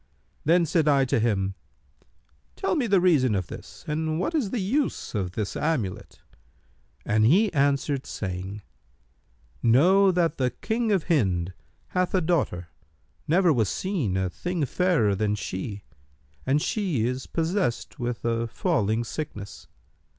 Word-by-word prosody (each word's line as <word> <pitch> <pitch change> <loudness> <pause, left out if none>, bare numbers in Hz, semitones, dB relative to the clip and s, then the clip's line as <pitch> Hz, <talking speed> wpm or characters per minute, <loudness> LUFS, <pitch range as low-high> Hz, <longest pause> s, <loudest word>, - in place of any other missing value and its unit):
Then 170 +3 +4
said 160 -1 +1
I 140 -2 +4
to 125 - +1
him, 100 -4 0 1.0
'Tell 385 - -1
me 270 -7 +1
the 200 -3 +4
reason 145 - +3
of 95 -2 -1
this - - -10
and 155 +1 -1
what 185 - -1
is 280 -11 0
the 245 - -2
use 255 +9 -1
of 95 -5 -2
this 105 -1 -3
amulet.' 140 - -2 0.8
And 110 0 +2
he 190 - +4
answered, 140 -1 +1
saying, 95 +1 -5 1.0
'Know 180 +12 +5
that 170 -3 +1
the 130 -2 +1
King 225 0 0
of 190 -5 +2
Hind 95 - +1 0.4
hath 180 +1 0
a 185 - +3
daughter, 140 - 0 0.6
never 175 +1 +4
was 110 -7 +1
seen 155 - -1
a 95 -1 -1
thing 175 - -2
fairer 165 - +2
than 105 +1 0
she, 100 +1 -5 0.6
and 145 +3 +2
she 175 - 0
is 125 +2 -3
possessed 165 - -1
with 120 -1 -3
a 115 0 0
falling 115 - 0
sickness. 105 -6 -7
140 Hz, 145 wpm, -26 LUFS, 105-180 Hz, 1.0 s, Know